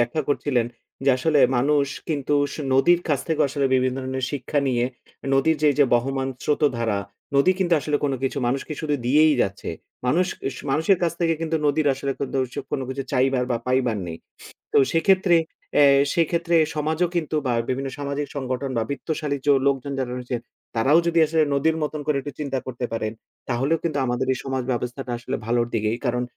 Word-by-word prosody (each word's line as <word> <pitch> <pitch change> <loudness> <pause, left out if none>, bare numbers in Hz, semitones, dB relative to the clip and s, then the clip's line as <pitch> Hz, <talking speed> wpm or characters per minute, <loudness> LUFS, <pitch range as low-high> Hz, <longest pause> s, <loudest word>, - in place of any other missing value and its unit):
ব্যাখ্যা 120 +6 0
করছিলে। 145 -3 +1 0.4
যে 140 - +5
আসলে 150 +3 +2 0.2
মানুষ 140 +2 +2 0.2
কিন্তু 145 -2 0 0.2
সু - - -6
নদীর 170 +7 +5
কাছ 145 -3 +2
থেকে 160 -1 0
আসলে 140 0 0
বিভিন্ন 130 0 +1
ধরনের 130 0 -3
শিক্ষা 145 +1 -2
নিয়ে, 120 -2 +1 0.5
নদীর 155 +4 +3
যে 150 - +6
যে 145 - +7
বহমান 135 +2 0
স্রোত 150 +1 0
ধারা, 110 -3 0 0.4
নদী 140 +7 +5
কিন্তু 175 -3 +2
আসলে 145 +2 0
কোন 140 - +1
কিছু 135 +2 -1
মানুষকে 135 +5 -2
শুধু 150 -2 -1
দিয়েই 150 +3 +5
যাচ্ছে। 100 -2 -4 0.4
মানুষ 175 +8 +3 0.2
উস - - -7
মানুষের 160 +6 +3
কাছ 170 -2 +2
থেকে 165 -1 +2
কিন্তু 165 0 0
নদীর 145 +1 +2
আসলে 135 +1 -2
কোনতোসু 130 -2 -2
কোন 140 - -1
কিছু 135 +1 -3
চাইবার 130 -1 +2
বা 120 - +2
পাইবার 125 -3 +1
নেই। 80 - -5 0.6
তো - - +3
সেক্ষেত্রে 185 +1 +4 0.4
এ্যা 145 - +7 0.3
সেক্ষেত্রে 170 0 +1 0.2
সমাজও 155 +3 0
কিন্তু 160 -2 -1
বা 125 - +1 0.2
বিভিন্ন 135 +1 -1
সামাজিক 145 0 -3
সংগঠন 130 0 -3
বা 115 - +1
বিত্তশালী 150 0 -2
যো 145 - +7
লোকজন 140 0 0
যারা 125 -2 -2
রয়েছেন। 125 -1 -4 0.4
তারাও 135 +8 +4
যদি 170 0 +2
আসলে 160 0 +2
নদীর 160 +3 +2
মতন 150 0 -3
করে 150 -2 +1
একটু 145 +2 -6
চিন্তা 135 -3 -2
করতে 125 -1 -4
পারেন, 110 -1 -2 0.4
তাহলেও 135 +7 +1
কিন্তু 160 -4 -1
আমাদের 125 +1 -1
এই 130 - -5
সমাজ 130 -1 -2
ব্যবস্থাটা 125 +1 -3
আসলে 130 +3 -4
ভালোর 120 0 +1
দিকেই। 110 +1 0
কারণ, 125 0 0
140 Hz, 185 wpm, -23 LUFS, 125-155 Hz, 0.6 s, যে